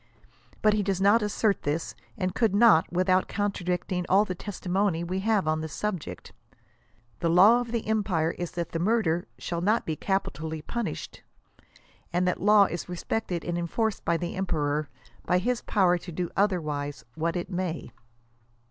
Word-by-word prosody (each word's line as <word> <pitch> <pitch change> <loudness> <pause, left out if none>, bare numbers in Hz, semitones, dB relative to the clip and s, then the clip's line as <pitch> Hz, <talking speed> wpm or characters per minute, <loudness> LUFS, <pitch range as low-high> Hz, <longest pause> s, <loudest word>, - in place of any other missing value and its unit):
But 215 -1 +5
he 210 - +2
does 195 -2 -1
not 205 +4 +5
assert 210 0 +1
this, 150 +3 -2 0.2
and 185 -2 -1
could 220 -3 +1
not 215 -7 +5
without 185 +1 +2
contradicting 180 -3 -2
all 200 +3 +5
the 185 - -3
testimony 185 -2 -1
we 185 +2 -2
have 205 -3 +1
(m 155 0 +1
the 160 - -3
subject, 185 +2 -5 0.9
The 165 - 0
law 200 +8 +6
of 240 -2 -6
the 235 -2 -2
empire 200 -7 +1
is 175 0 -5
that 170 -1 -4
murder 180 -5 +1
shall 170 -1 -4
not 215 +5 +2
be 160 - -2
capitally 160 -4 -2
punished, 235 +6 -5 0.9
and 180 +1 +1
that 180 - -1
law 210 +1 +6
is 175 -1 -5
respected 180 0 -3
and 175 0 -2
enforc 215 +5 -1
ed - - -23
by 170 - +1
the 175 0 -4
emperor, 150 -5 -1 0.4
be 180 - +4
his 240 +6 0
power 180 -4 +2
to 175 - -9
do 175 +1 -3
otherwise 150 - -1
what 165 +1 -2
it 175 +2 -4
may. 175 -7 -3
180 Hz, 165 wpm, -27 LUFS, 170-205 Hz, 0.9 s, law